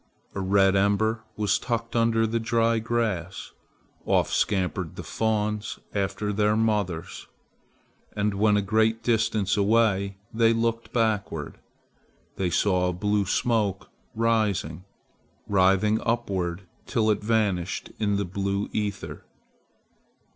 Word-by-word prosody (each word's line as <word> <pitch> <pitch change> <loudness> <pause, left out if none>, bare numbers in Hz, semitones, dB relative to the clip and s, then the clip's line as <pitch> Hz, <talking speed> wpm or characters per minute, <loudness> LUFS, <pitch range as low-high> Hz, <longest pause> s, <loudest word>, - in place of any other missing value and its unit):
A - - -4
red 95 0 +3
ember 105 +3 +2 0.2
was 105 -1 +1
tucked 115 -1 -3
under 115 -1 +3
the 115 +1 -1
dry 115 0 +1
grass. 110 -6 -2 0.5
Off - - +1
scampered 95 -4 -1
the - - -7
fawns 105 -1 -1 0.2
after 100 +1 -1
their 105 +1 +2
mothers; 105 -7 -1 0.9
and 105 0 0
when 105 +1 +3
a 100 - +1
great 110 +2 +1
distance 110 -4 +1
away 100 -2 +2 0.2
they 115 0 +4
looked 115 0 -1
backward. 105 - -1 0.8
They 95 -2 0
saw 90 0 +2
a - - -2
blue 105 +2 0
smoke 105 -3 0 0.2
rising, 105 -7 0 0.6
writhing 100 +2 +3
upward 100 -6 -2 0.2
till 110 -4 +2
it 105 - -1
vanished 105 -5 0
in 105 -2 +1
the 100 - -1
blue 100 +2 -2
ether. 105 -2 -4
105 Hz, 120 wpm, -26 LUFS, 95-110 Hz, 0.9 s, they